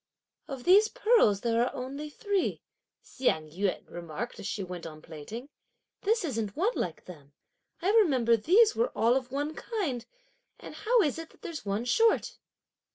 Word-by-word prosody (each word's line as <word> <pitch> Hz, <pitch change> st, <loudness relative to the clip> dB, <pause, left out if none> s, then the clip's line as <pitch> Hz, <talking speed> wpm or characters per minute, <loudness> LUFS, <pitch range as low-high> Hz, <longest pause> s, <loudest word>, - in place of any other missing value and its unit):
"Of 270 Hz, -3 st, -6 dB
these 405 Hz, -, +6 dB
pearls 445 Hz, -, +3 dB
there 230 Hz, 0 st, +2 dB
are 245 Hz, -, -2 dB
only 275 Hz, +4 st, -5 dB
three," 400 Hz, +5 st, -1 dB, 0.4 s
Hsiang 160 Hz, -, -1 dB
yün 190 Hz, +3 st, -2 dB
remarked 175 Hz, +7 st, -6 dB
as -, -, -5 dB
she 200 Hz, -, -3 dB
went 180 Hz, -2 st, -7 dB
on 155 Hz, -1 st, -10 dB
plaiting; 165 Hz, -, -9 dB, 0.5 s
"this 435 Hz, -1 st, +1 dB
isn't 225 Hz, -8 st, -3 dB
one 405 Hz, +9 st, +2 dB
like -, -, -4 dB
them; 145 Hz, -5 st, -13 dB, 0.5 s
I 385 Hz, -, +3 dB
remember 270 Hz, -, +4 dB
these 410 Hz, -, +4 dB
were 475 Hz, +2 st, +1 dB
all 230 Hz, +2 st, +4 dB
of 255 Hz, -2 st, -2 dB
one 290 Hz, +3 st, -2 dB
kind, 315 Hz, -, -3 dB, 0.5 s
and -, -, -10 dB
how 465 Hz, -1 st, +2 dB
is 295 Hz, 0 st, -1 dB
it 325 Hz, -, -8 dB
that -, -, -24 dB
there's 310 Hz, -11 st, -6 dB
one 205 Hz, +4 st, -1 dB
short?" 450 Hz, -, +2 dB
255 Hz, 165 wpm, -29 LUFS, -, 0.5 s, these